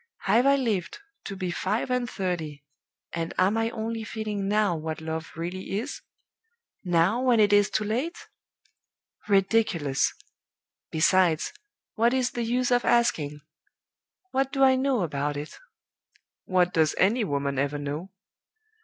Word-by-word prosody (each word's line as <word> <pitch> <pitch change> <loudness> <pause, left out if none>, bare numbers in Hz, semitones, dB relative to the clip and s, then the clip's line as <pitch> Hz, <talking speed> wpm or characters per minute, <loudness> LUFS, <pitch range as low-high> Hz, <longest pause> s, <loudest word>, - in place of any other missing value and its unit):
Have 245 +4 +3
I 280 - +6
lived 225 - -1 0.3
to 195 - -5
be 185 -2 -3
five 210 +8 -1
and 250 -1 0
thirty, 165 -8 -4 0.5
and 165 -1 -3
am 190 +3 +3
I 225 0 +1
only 225 0 -4
feeling 210 -2 -4
now 205 -3 +2
what 160 0 -4
Love 160 0 -5
really 180 +4 -4
is? 245 +7 -5 0.8
now, 180 +6 +2
when 250 -3 +3
it 205 -1 +4
is 205 0 +5
too 215 - 0
late? 250 +11 -3 1.0
Ridiculous! 195 -8 +2 0.7
Besides, 170 - +2 0.4
what 235 +3 +2
is 255 -1 +1
the 240 - -3
use 245 +2 0
of 245 0 +3
asking? 155 -12 +1 0.9
What 270 0 0
do 270 -1 +2
I 260 -1 +6
know 260 -5 +1
about 145 -2 -2
it? 150 +2 -7 0.9
What 180 -1 +2
does 160 -2 +2
any 220 +5 +3
woman 140 -6 -1
ever 145 +1 0
know? 145 +6 -5
195 Hz, 140 wpm, -26 LUFS, 165-235 Hz, 1.0 s, I